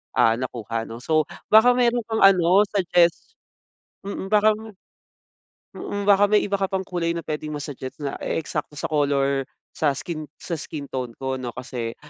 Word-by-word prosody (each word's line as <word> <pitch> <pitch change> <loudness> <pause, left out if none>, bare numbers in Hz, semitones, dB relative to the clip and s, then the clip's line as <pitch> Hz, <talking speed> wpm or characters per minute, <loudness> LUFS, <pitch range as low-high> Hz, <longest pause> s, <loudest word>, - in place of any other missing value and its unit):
ah, 115 0 +4
nakuha 115 -3 -4
'no. 115 +2 -8
So 155 -2 +2 0.3
baka 230 +3 +7
meron 240 -1 +2
kang 220 -1 -1
ano 185 +1 +5
suggest 175 -3 +2 0.7
Mm 195 -1 -5
baka, 215 +1 +5 1.2
mm, 205 0 -4
baka 200 0 +6
may 210 - +5
iba 200 - -2
ka 195 - +1
pang 190 -1 -1
kulay 170 -2 -1
na - - -2
puwedeng 155 0 -4
ma-suggest 140 -3 -7
na 140 - -2
e-eksakto 150 -1 -3
sa - - -2
color 140 -2 +1 0.3
sa 150 -3 +1
skin 155 -3 -5
sa 175 - -8
skin 150 -3 -6
tone 125 -3 -3
ko, 130 0 -3
'no? 125 - -4
Kasi 120 -3 -5
155 Hz, 165 wpm, -23 LUFS, 135-195 Hz, 1.2 s, baka